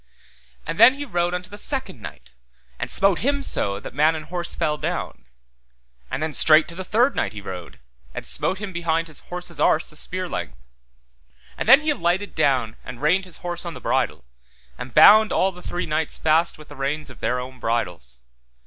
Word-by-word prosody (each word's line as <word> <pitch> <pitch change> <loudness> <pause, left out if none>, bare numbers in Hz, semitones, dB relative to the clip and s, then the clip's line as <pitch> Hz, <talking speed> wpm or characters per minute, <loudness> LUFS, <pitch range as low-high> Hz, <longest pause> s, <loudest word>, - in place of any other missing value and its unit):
And 170 - -5
then 240 +4 +8
he 290 +1 -5
rode 175 -6 -1
unto 180 +1 -6
the 205 - -8
second 220 - -4
knight, 65 -8 -10 0.5
and - - -3
smote 195 -2 +4
him 280 +2 0
so 100 - -1
that - - -9
man 155 +4 +3
and 155 -1 -6
horse 175 +2 -3
fell 155 -3 0
down. 65 -2 -4 0.8
And 150 - -3
then 155 -1 -3
straight 155 +1 +5
to - - -8
the 190 - -5
third 240 +8 +2
knight - - -1
he 105 - -7
rode, 90 -7 -8 0.4
and - - -5
smote 190 - +2
him 200 -1 -6
behind 165 -1 -1
his 155 - -12
horse's 175 -1 -8
arse 160 - +2
a - - -15
spear 185 +4 -5
length. - - -6 0.9
And - - -3
then 270 +4 +9
he 305 0 +1
alighted 190 -5 -1
down 130 -7 +1
and 120 - -9
reined 180 +6 +2
his 180 - -9
horse 175 -1 -2
on 170 -2 -6
the - - -8
bridle, - - -1 0.5
and 125 - -8
bound 210 - +7
all 190 - +2
the 180 -1 -13
three 175 - -3
knights 155 +1 -2
fast 160 +2 +2
with 155 0 -15
the 145 - -11
reins 140 +1 -3
of - - -15
their 125 - -1
own 130 +1 -8
bridles. 90 - -2
165 Hz, 205 wpm, -23 LUFS, 135-185 Hz, 0.9 s, then